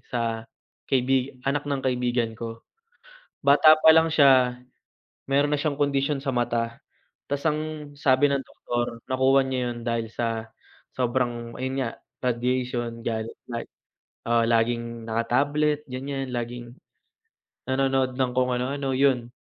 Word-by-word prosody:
sa 115 -2 -1 0.4
kaibig 130 0 +1
anak 145 +1 0
ng 140 -2 -2
kaibigan 125 -3 0
ko. 115 0 -7 0.8
Bata 150 +3 +7
pa 160 - +8
lang 160 0 +5
siya, 130 -4 +5 0.7
meron 140 +2 +2
na - - -4
siyang 145 -1 -1
kondisyon 140 0 +1
sa 135 - -1
mata. 115 -1 -1 0.5
Ta's 140 0 -1
ang 155 -1 -2
sabi 140 -1 +3
ng 140 -1 0
doktor 120 -2 -4
nakuha 130 +1 +3
niya 130 -2 -1
yun 120 0 -7
dahil 115 -1 -1
sa 115 -1 -3 0.5
sobrang, 120 -1 -1
ayun 130 +1 -3
nga, 120 - -2 0.4
radiation, 120 -1 -1
gadget 110 0 -3
like 115 -1 -6 0.6
oo, 115 0 +3
laging 115 0 0
naka-tablet 145 +7 +1
ganyan 135 +1 -4
laging, 120 0 -4 1.0
nanonood 130 -1 +1
ng 130 -2 0
kung 125 0 +2
anu-ano, 135 +1 -2
yun. 130 -3 +2
125 Hz, 130 wpm, -25 LUFS, 120-140 Hz, 1.0 s, pa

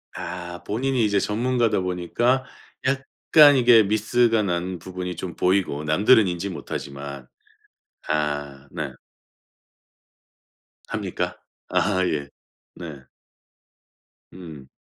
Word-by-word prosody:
아. 90 0 -6
본인이 125 +2 0
이제 100 -1 +2
전문가다 115 +1 +1
보니까 115 +9 0 0.4
약간 140 +2 +4
이게 120 -3 +6
miss가 110 +2 +2
난 90 0 -2
부분이 90 0 -6
좀 85 -3 -6
보이고 90 -6 +1
남들은 100 +7 +4
인지 90 +3 -3
못하지만. 70 -5 -7 0.8
아. 70 -2 -2
네. - - -4 2.0
합니까? - - -3 0.3
아 95 -2 +1
예. 70 -2 -2 0.5
네. 75 -6 -9 1.3
음. 80 -7 -11
90 Hz, 195 characters per minute, -23 LUFS, 80-115 Hz, 2.0 s, 이게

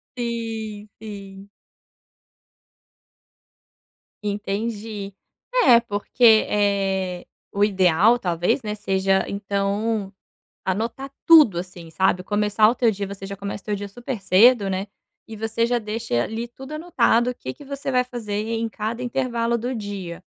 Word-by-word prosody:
Sim! 225 -3 -4
Sim! 200 -2 -9 2.8
Entendi. 205 0 -3 0.5
É, 240 -4 +8
porque, 220 +2 -4 0.3
eh, 195 -3 0 0.3
o 200 - -3
ideal 195 +2 +4
talvez, 175 +4 0
né, 210 -1 -3
seja 195 -2 +1
então, 200 +1 -2 0.5
anotar 230 +8 -2 0.2
tudo 300 - +7
assim, 175 -2 -7
sabe? 180 +2 +1
Começar 210 +2 +2
o 240 - 0
teu 235 -3 +3
dia 200 -1 -4
você 195 -1 -8
já 200 0 -7
começa 200 0 -5
o - - -36
teu 210 - 0
dia 205 0 -5
super 240 +2 -6
cedo, 200 +2 +5
né, 190 +2 -2 0.4
e 220 -1 -8
você 225 +1 0
já 240 +1 +1
deixa, 220 - -4
eh, 120 - +3
ali, 225 - -3
tudo 265 +4 -10
anotado, 250 -7 +2
o 250 - -4
que 130 - -6
que - - -14
você 280 0 -5
vai 250 -1 +3
fazer 220 -5 -4
e 225 +1 -2
em 230 - -1
cada 225 +2 -4
intervalo 240 -2 -1
do 245 +3 -3
dia. 195 -5 -6
210 Hz, 145 wpm, -23 LUFS, 195-235 Hz, 2.8 s, É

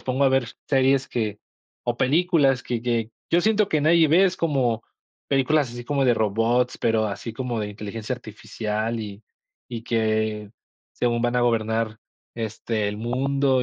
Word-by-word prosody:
pongo 130 +2 0
a - - +6
ver 130 -2 +2 0.2
series 135 -1 +3
que 105 -3 -2 0.5
o 120 -1 -1
películas 145 -2 +3
que 120 -2 -3
que 115 -2 -1 0.2
yo 170 - +4
siento 215 0 +2
que 155 - +1
nadie 165 +1 +5
ve, 180 +5 +5
es 185 -1 +1
como 130 -8 0 0.5
películas 140 0 +2
así 120 0 -8
como 140 0 0
de 120 -2 +4
robots, 115 +4 +1
pero 110 -1 +2
así 105 +3 -5
como 120 0 -3
de 105 - -3
inteligencia 105 +3 -5
artificial, 110 0 -4
y 105 -1 -8 0.5
y 115 -2 -6
que 110 -2 0 0.4
según 120 -1 0
van 120 0 +1
a - - +3
gobernar, 110 -2 0 0.4
este, 110 -1 -2
el 105 - -4
mundo 130 +3 +1
120 Hz, 165 wpm, -24 LUFS, 110-135 Hz, 0.5 s, a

